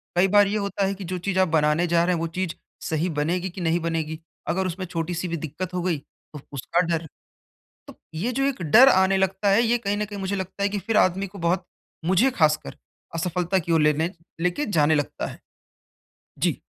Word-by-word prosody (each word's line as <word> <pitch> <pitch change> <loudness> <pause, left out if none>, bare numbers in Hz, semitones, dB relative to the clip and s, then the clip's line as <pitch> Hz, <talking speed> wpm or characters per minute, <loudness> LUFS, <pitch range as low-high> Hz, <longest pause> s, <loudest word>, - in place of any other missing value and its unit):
कई 185 +2 +4
बार 205 +1 +5
ये 210 +2 0
होता 200 -1 -1
है 195 - 0
कि 195 - -8
जो 185 +1 -3
चीज़ 190 +1 -1
आप 185 - +4
बनाने 155 +2 +2
जा 170 0 +3
रहे 180 +1 +2
हैं - - -2
वो 165 - -1
चीज़ 185 -3 -1 0.4
सही 160 +3 0
बनेगी 170 +5 -1
कि 180 +1 -8
नहीं 165 +1 +1
बनेगी? 160 -1 -2 0.3
अगर 190 +1 0
उसमें 185 +2 -4
छोटी-सी 170 +1 -3
भी 170 0 -2
दिक्कत 165 +4 -5
हो 180 - -1
गई, 175 -3 0
तो 145 +1 -15
उसका 155 +6 0
डर। 165 -1 -1 0.8
तो - - -12 0.2
ये 220 +10 -1
जो 270 +2 0
एक 270 -9 -1
डर 240 - +7
आने 190 -2 +4
लगता 190 +1 +1
है 215 +4 +5
ये 240 +1 +2
कहीं 205 -3 -2
न 210 - -1
कहीं 205 -1 -7
मुझे 195 +1 -2
लगता 190 +1 -4
है 200 - +2
कि 205 0 -2
फिर 210 +3 0
आदमी 195 0 +2
को 200 +2 -12
बहुत 175 +2 0 0.4
मुझे 190 +9 +3
खासकर 155 -8 +1 0.4
असफलता 180 +2 0
की 170 0 -4
ओर 160 -2 +4
लेने 150 +3 +2 0.3
लेके 180 +12 0
जाने 155 -6 +3
लगता 145 -1 -2
है। - - -9 1.0
जी। - - 0
180 Hz, 220 wpm, -24 LUFS, 165-195 Hz, 1.0 s, डर